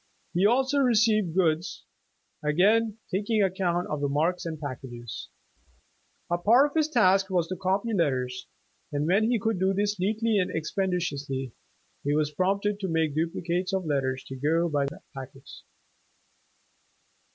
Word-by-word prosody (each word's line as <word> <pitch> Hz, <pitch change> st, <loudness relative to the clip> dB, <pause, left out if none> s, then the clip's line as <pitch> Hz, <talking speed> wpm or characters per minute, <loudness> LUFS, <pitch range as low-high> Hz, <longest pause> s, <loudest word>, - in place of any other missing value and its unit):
He 185 Hz, +3 st, +4 dB
also 265 Hz, +4 st, +2 dB
received 220 Hz, -, +3 dB
goods, 165 Hz, -2 st, 0 dB, 0.6 s
again 205 Hz, +8 st, +3 dB
taking 205 Hz, +3 st, +1 dB
ac 190 Hz, -2 st, +1 dB
count 175 Hz, -1 st, +1 dB
of 150 Hz, -1 st, -3 dB
the 145 Hz, -, 0 dB
marks 165 Hz, +5 st, 0 dB
and 160 Hz, -2 st, -5 dB
packages. 125 Hz, -5 st, -7 dB, 1.0 s
A 175 Hz, -, +1 dB
part 235 Hz, +9 st, +5 dB
of -, -, -21 dB
his 315 Hz, -1 st, +2 dB
task 195 Hz, -7 st, +3 dB
was 175 Hz, -3 st, +1 dB
to 185 Hz, -, -2 dB
copy 195 Hz, +5 st, -1 dB
letters, 130 Hz, -8 st, -1 dB, 0.4 s
and 145 Hz, 0 st, -1 dB
when 200 Hz, +7 st, +3 dB
he 245 Hz, -, +3 dB
could 220 Hz, -2 st, -1 dB
do 190 Hz, +1 st, +2 dB
this 205 Hz, 0 st, 0 dB
neatly 215 Hz, +3 st, +1 dB
and 180 Hz, -, 0 dB
expeditiously, 150 Hz, -, -2 dB, 0.5 s
he 145 Hz, +1 st, +1 dB
was 150 Hz, -1 st, +1 dB
promoted 200 Hz, +5 st, 0 dB
to 195 Hz, -, -2 dB
making 160 Hz, -3 st, 0 dB
dupli 165 Hz, +2 st, -2 dB
cates 180 Hz, +2 st, -1 dB
of 190 Hz, -2 st, -1 dB
letters 135 Hz, -3 st, -1 dB
to 135 Hz, -, -8 dB
go 160 Hz, +6 st, +1 dB
by 145 Hz, -3 st, 0 dB
the 140 Hz, -, -8 dB
packets. 135 Hz, 0 st, -10 dB
180 Hz, 155 wpm, -27 LUFS, 150-205 Hz, 1.0 s, part